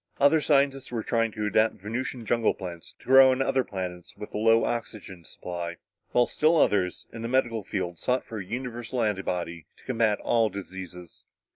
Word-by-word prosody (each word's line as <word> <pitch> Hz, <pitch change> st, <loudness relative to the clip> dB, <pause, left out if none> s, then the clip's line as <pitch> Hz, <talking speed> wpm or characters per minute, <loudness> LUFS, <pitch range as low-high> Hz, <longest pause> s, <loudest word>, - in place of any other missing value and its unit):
Other 145 Hz, +3 st, +5 dB
scientists 140 Hz, -3 st, +2 dB
were 115 Hz, -2 st, -2 dB
trying 115 Hz, -1 st, +1 dB
to 105 Hz, -1 st, -3 dB
adapt 110 Hz, +2 st, +2 dB
Venusian 115 Hz, +4 st, -5 dB
jungle 115 Hz, 0 st, +2 dB
plants 85 Hz, -3 st, -8 dB
to -, -, -21 dB
grow 135 Hz, 0 st, +8 dB
on 130 Hz, 0 st, +1 dB
other 135 Hz, 0 st, +2 dB
planets 90 Hz, -4 st, -6 dB
with 105 Hz, -, -9 dB
a -, -, -2 dB
low 115 Hz, +1 st, +4 dB
oxygen 105 Hz, -6 st, -5 dB
supply; 85 Hz, +2 st, -6 dB, 0.3 s
while 125 Hz, -, +3 dB
still 155 Hz, +6 st, +2 dB
others, 95 Hz, -, +2 dB
in 115 Hz, -, -7 dB
the 115 Hz, -, -3 dB
medical 120 Hz, -3 st, 0 dB
field, 90 Hz, -3 st, -4 dB
sought 125 Hz, +1 st, 0 dB
for 110 Hz, -, -7 dB
a -, -, -4 dB
universal 120 Hz, +3 st, -4 dB
antibody 90 Hz, -5 st, -2 dB
to -, -, -21 dB
combat 115 Hz, -5 st, +1 dB
all 115 Hz, -2 st, +2 dB
diseases. 95 Hz, -3 st, -9 dB
110 Hz, 180 wpm, -27 LUFS, 95-125 Hz, 0.3 s, grow